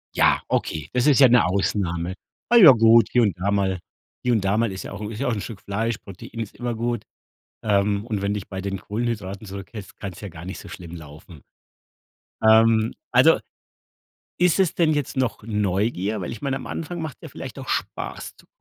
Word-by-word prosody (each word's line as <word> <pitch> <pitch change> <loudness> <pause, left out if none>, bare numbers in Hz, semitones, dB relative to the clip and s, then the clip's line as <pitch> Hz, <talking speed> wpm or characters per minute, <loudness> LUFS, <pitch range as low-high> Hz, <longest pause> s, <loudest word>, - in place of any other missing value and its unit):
Ja, - - +4
okay, 80 -1 -2
das 125 0 +1
ist 145 -4 +5
ja 135 - +9
'ne 120 0 +5
Ausnahme. 90 -2 -1 0.3
Ah, 240 - +4
ja 185 - +10
gut, 115 0 +6
hier 125 - +4
und 100 -7 +1
da 100 +3 -1
mal 95 -2 0 0.4
hier 125 - +2
und 110 - +2
da 100 +2 +1
mal 115 -3 +1
ist 95 - -6
ja - - -8
auch 100 +1 -7
'n 105 - -4
ist 110 - -7
ja 135 - -1
auch 115 -4 0
Stück 105 -1 -7
'n - - -28
Fleisch, 110 +3 -1
Protein 100 +4 -10
ist 110 -2 -5
immer 120 -1 -3
gut. 120 +1 -2 0.6
Ähm, 100 0 +1
und 105 -4 -2
wenn 100 +1 0
dich 100 -2 -5
bei 95 -1 -5
den 95 0 -3
Kohlenhydraten 105 -2 -4
zurückhälst, 100 +1 -9
kann's 95 -4 -7
ja 100 - -6
gar 80 -1 -10
nicht 95 - -6
so - - -11
schlimm 85 -1 -9
laufen. 75 0 -13 1.0
Ähm, 110 0 +5 0.2
also, - - +6 1.0
ist 180 0 +3
es 190 -4 +2
denn 160 -3 +3
jetzt 145 -3 -3
noch 125 -6 -1
Neugier, 105 -1 -1
weil 85 - -4
ich 115 - -8
meine, 135 -1 -1
am - - -7
Anfang 170 +2 -5
macht's 155 -5 -6
ja - - -8
vielleicht - - -8
auch - - -8
Spaß - - -4
zu. - - -21
105 Hz, 215 wpm, -23 LUFS, 95-120 Hz, 1.0 s, ja